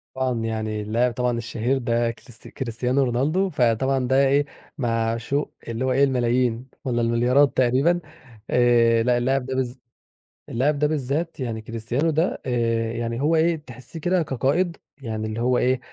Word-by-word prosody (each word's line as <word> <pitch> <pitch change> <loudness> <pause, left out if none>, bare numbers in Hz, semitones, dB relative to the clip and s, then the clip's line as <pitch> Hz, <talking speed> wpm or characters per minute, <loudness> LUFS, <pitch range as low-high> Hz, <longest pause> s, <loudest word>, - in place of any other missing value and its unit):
طبعًا 130 -2 -1
يعني 110 -1 -2
اللاعب 115 +4 0
طبعًا 125 -1 0
الشهير 120 +3 -1
ده 120 -2 0
كريست 115 0 -13
كريستيانو 125 +2 -1
رونالدو، 145 +10 +1
فطبعًا 130 -1 +1
ده 135 +2 +4
إيه، 140 +2 +3 0.3
معشوق 115 +3 -1
اللي 115 +2 -2
هو 130 - +1
إيه 135 +2 +3
الملايين 125 -2 +1 0.2
والَّا 120 -2 0
المليارات 120 +4 +3
تقريبًا. 130 +8 +3 0.5
آآ، 120 -2 +4
لأ، 125 0 +2
اللاعب 130 +2 0
ده 130 0 -3
بالذ 130 -2 -1 0.8
اللاعب 140 +5 +1
ده 150 - +3
بالذَّات، 150 +3 -2
يعني 115 -4 -3
كريستيانو 115 +7 -1
ده، 160 +4 0
آآ، 115 -2 0
يعني 115 +1 -3
هو 155 +3 +3
إيه 165 +1 +3
تحسِّيه 150 +1 -10
كده 175 +2 +1
كقائد، 150 +6 0 0.2
يعني 110 -3 -4
اللي 110 +1 -4
هو 125 +1 +2
إيه، 130 +1 +2
125 Hz, 160 wpm, -23 LUFS, 115-140 Hz, 0.8 s, ده